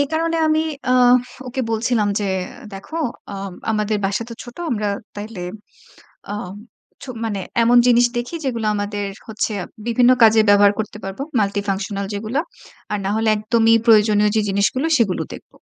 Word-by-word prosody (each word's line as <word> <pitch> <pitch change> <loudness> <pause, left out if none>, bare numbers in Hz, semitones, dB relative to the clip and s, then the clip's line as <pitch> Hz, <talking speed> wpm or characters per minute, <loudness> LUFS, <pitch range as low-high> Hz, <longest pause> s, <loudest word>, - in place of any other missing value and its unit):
এ - - +5
কারণে 330 +1 0
আমি 310 0 +2 0.3
আ - - +4 0.6
ওকে 260 +2 -3
বলছিলাম 225 -1 +1
যে, - - -1 0.5
দেখো 195 +11 -8 0.4
অম 195 -1 -6 0.2
আমাদের 215 0 0
বাসা 200 +3 0
তো 230 - -7
ছোট। 240 0 -12
আমরা 210 -3 -1 0.3
তাইলে 205 -1 -7 0.9
আম 195 -3 -5 0.5
ছো 280 - -10 0.2
মানে 205 -3 -2 0.2
এমন 240 +1 +5
জিনিস 245 0 +5
দেখি 240 +6 -3
যেগুলা 230 -5 -1
আমাদের 205 0 -3 0.2
হচ্ছে 220 0 -2 0.3
বিভিন্ন 240 +1 +4
কাজে 220 0 +7
ব্যবহার 205 0 +6
করতে 210 -1 -4
পারব। 195 0 -6 0.2
multifunctional 200 0 -2
যেগুলা। 220 +7 -2 0.5
আর 210 - 0
না 195 - -1
হলে 220 0 +1
একদমই 225 +1 +3
প্রয়োজনীয় 210 -2 +5
যে - - +4
জিনিসগুলো 200 +9 +1
সেগুলো 205 -6 +1
দেখব। - - -11
215 Hz, 155 wpm, -20 LUFS, 205-235 Hz, 0.9 s, কাজে